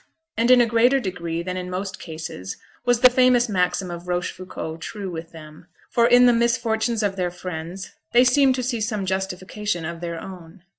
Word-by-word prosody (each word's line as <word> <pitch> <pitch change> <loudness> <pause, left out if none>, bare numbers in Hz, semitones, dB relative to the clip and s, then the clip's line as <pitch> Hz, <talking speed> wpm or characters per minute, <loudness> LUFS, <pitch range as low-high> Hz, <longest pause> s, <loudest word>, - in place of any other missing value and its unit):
And 230 +2 +1
in 250 -1 +7
a - - +5
greater 235 +4 +3
degree 170 -6 -4
than 185 +1 -4
in 180 0 -5
most 190 +1 -4
cases 155 - -7 0.3
was 245 -1 +2
the 255 - +9
famous 250 -1 +4
maxim 180 -2 0
of 175 +1 -8
Rochefoucault 180 -2 -4
true 200 -4 -6
with 165 0 -7
them; 155 +1 -13 0.2
for 235 -1 +4
in 245 +1 +6
the 245 - +6
misfortunes 230 -1 +1
of 195 -1 -1
their 180 -1 0
friends 180 +1 -7 0.2
they 245 +1 +6
seemed 260 +1 +4
to 255 - -3
see 240 -2 -2
some 210 -2 -2
justification 190 0 -3
of 170 0 -6
their 170 -1 -4
own. 180 -1 -11
190 Hz, 190 wpm, -23 LUFS, 175-235 Hz, 0.3 s, the